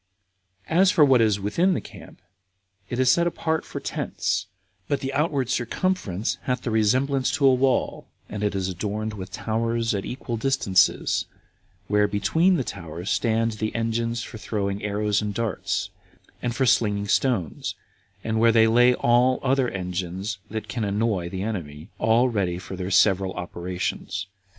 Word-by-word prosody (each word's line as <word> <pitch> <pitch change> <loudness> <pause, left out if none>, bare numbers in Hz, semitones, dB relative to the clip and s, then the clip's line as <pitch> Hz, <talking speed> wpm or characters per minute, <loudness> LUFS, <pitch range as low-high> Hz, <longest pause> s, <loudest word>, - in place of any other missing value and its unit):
3 160 - -3
2. - - +6
As 195 - +6
for 150 - +5
what 130 -4 +5
is 105 -3 +2
within 170 - +1
the - - 0
camp, - - -13 0.7
it 120 - -3
is 130 0 +4
set 170 +4 +3
apart 160 -2 -1
for - - -6
tents, - - -2 0.4
but 140 - 0
the 135 0 -4
outward 145 -3 0
circumference 120 - -1
hath 125 -1 -1
the 120 - -2
resemblance 130 +5 +2
to 140 - +1
a 135 - +7
wall, 130 0 0 0.2
and 105 0 -5
is 95 -2 0
adorned 105 +4 -3
with 95 -3 -7
towers 115 +3 -1
at 100 -1 -2
equal 120 -2 -4
distances, 110 -7 +2 0.6
where 105 0 +3
between 160 - +2
the 135 - 0
towers 85 -1 -6
stand 115 0 +1
the 110 0 -4
engines 115 0 -1
for 110 - -9
throwing 100 -2 -2
arrows 105 0 0
and 105 -1 -3
darts, 115 -3 -2 0.5
and 120 -1 -2
for 130 - +1
slinging 105 -4 +2
stones, 105 - 0 0.5
and 110 0 -1
where 115 0 +5
they 110 0 +5
lay 120 +2 +5
all 125 +2 +3
other 135 -1 +2
engines 95 +2 -4
that 110 0 -5
can 120 -3 -3
annoy 100 -3 0
the 95 +1 -4
enemy, 80 -8 -5
all 115 +3 +4
ready 95 -7 -1
for 90 +1 -7
their 90 0 -4
several 95 -1 +3
operations. 90 +2 -4
110 Hz, 165 wpm, -24 LUFS, 100-125 Hz, 0.7 s, a